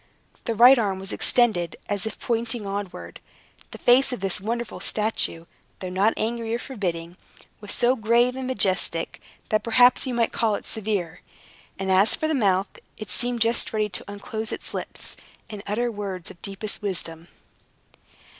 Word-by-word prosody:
The 230 - -1
right 245 +4 +8
arm 200 -4 0
was 190 0 -3
extended, 215 -9 +2
as 205 +1 -1
if 220 - -7
pointing 230 -1 -2
onward. 200 -1 -5 0.5
The - - -9
face 255 +3 +5
of 250 - -3
this 190 -1 -1
wonderful 235 +3 -3
statue, 210 -6 -1 0.3
though 185 -1 -6
not 195 +4 +2
angry 230 0 -1
or - - 0
forbidding, 180 -9 -4 0.4
was 205 -1 -6
so 245 +2 +3
grave 240 +2 +3
and 260 -1 -4
majestic, 190 -8 0 0.3
that 215 - +2
perhaps 245 +3 +5
you 250 - -2
might 230 -1 +2
call 220 -2 +1
it - - -7
severe; 195 -6 -3 0.6
and 190 0 -1
as 195 +3 +5
for 315 - -1
the 315 - 0
mouth, 200 -7 +1 0.2
it 215 -3 -7
seemed 245 -1 0
just 230 +1 +2
ready 215 -1 0
to 195 +1 -5
unclose 215 +2 -4
its - - -5
lips, - - -5 0.3
and 210 -2 -6
utter 235 +4 0
words 195 -5 -5
of - - -15
the - - -5
deepest 205 +3 -4
wisdom. 170 -4 -3
215 Hz, 170 wpm, -24 LUFS, 195-235 Hz, 0.6 s, right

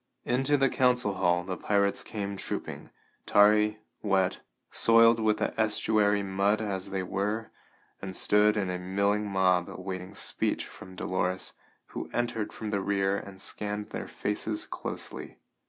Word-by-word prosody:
Into 135 +4 +2
the 135 -1 +3
council 125 -5 +2
hall 90 -2 +1
the 95 0 -4
pirates 100 +3 +1
came 100 -2 -5
trooping, - - -6 0.4
tarry, 105 +1 +5 0.2
wet, 95 -3 +1 0.3
soiled 115 0 +6
with 110 -1 +2
the - - -1
estuary 105 -1 +2
mud 100 +2 +1
as 100 -3 -3
they 95 -1 -2
were, 105 +4 -2 0.5
and 95 -1 -5
stood 105 +3 +4
in 95 -3 -1
a 90 - -3
milling 100 +3 0
mob 90 -2 +2
awaiting 95 +1 -7
speech - - -1
from 95 0 -12
Dolores, 90 0 -2 0.4
who - - -6
entered 115 -3 -1
from 110 -1 -6
the 100 -2 0
rear 100 0 +1
and 95 -1 -7
scanned 105 +1 -3
their - - -5
faces 105 +1 -2
closely. - - -4
100 Hz, 145 wpm, -28 LUFS, 95-105 Hz, 0.5 s, soiled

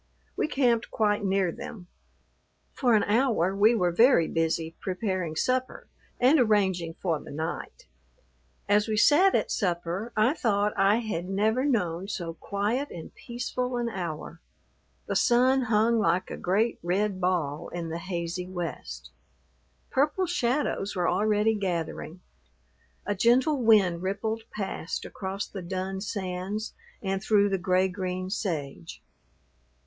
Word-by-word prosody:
We - - 0
camped 245 -6 +1
quite 210 -1 +1
near 190 -2 +1
them. 185 +2 -9 0.9
For 245 -4 +3
an 210 - +3
hour 210 -5 +2
we 215 +4 +5
were 180 -5 +2
very 225 - +5
busy 165 0 -1
preparing 185 -4 -2
supper 255 +8 -1 0.3
and 270 +5 +5
arranging 190 -8 +2
for 165 -5 -1
the - - -12
night. 160 - -5 0.8
As 205 +1 +3
we 215 -1 -1
sat 345 - +5
at - - 0
supper 180 +2 -2
I 220 +6 +4
thought 210 -8 +1
I 195 +1 +4
had 205 -7 -3
never 220 +7 +1
known 190 - 0
so 170 -5 -4
quiet 210 - -2
and 165 -2 -9
peaceful 245 +1 -4
an 240 -1 -1
hour. 170 -4 -6 0.6
The - - -3
sun 255 +2 +4
hung 225 +1 +3
like 180 -2 +1
a - - -3
great, 210 +6 0
red 185 +2 -1
ball 165 -5 -1
in 170 -1 -5
the 165 +1 -4
hazy 175 0 -4
west. 175 -2 -6 0.8
Purple 295 +7 +1
shadows 260 - -1
were 180 -2 +1
already 210 +3 +2
gathering. 175 -3 -3 0.8
A 205 - 0
gentle 250 +7 +3
wind 200 -7 +4
rippled 220 +4 -2
past 190 -4 -4
across 195 +1 -4
the 195 - -8
dun 190 +2 -4
sands 195 +1 -4 0.3
and 195 -1 -1
through 205 -1 +3
the 195 -1 0
gray 185 +1 +2
green 185 -1 -4
sage. 145 - -4
200 Hz, 135 wpm, -27 LUFS, 180-225 Hz, 0.9 s, we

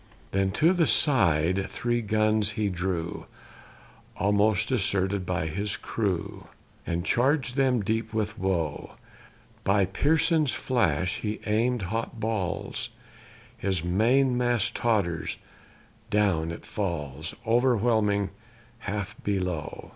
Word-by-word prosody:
Then 95 0 +1
to 165 +4 +4
the 170 -4 +2
side 95 - +3
three 120 0 -1
guns 110 0 +2
he 105 -2 0
drew 90 -2 -3 0.9
(Almost 105 +1 +2
deserted 100 -5 0
by 90 -2 -1
his 100 +6 -2
crew), 100 -6 -3 0.4
And 85 +1 -2
charg'd 130 +3 +1
them 130 -5 +2
deep 110 +2 -1
with 110 -1 -2
woe; 90 -7 -2 0.7
By 100 0 +3
Pearson's 150 - +2
flash 90 - 0
he 105 0 -3
aim'd 115 +2 +1
hot 115 +1 -3
balls; 110 -5 -2 0.7
His 95 -4 -2
main 120 +9 +3
mast 120 -3 +1
totters 100 -8 0 0.7
down 95 -6 +2
it 85 - -8
falls 80 -6 -4
O'erwhelming 110 -4 +2 0.5
half 100 -1 -4
below. 90 -6 -3
105 Hz, 110 wpm, -27 LUFS, 95-115 Hz, 0.9 s, to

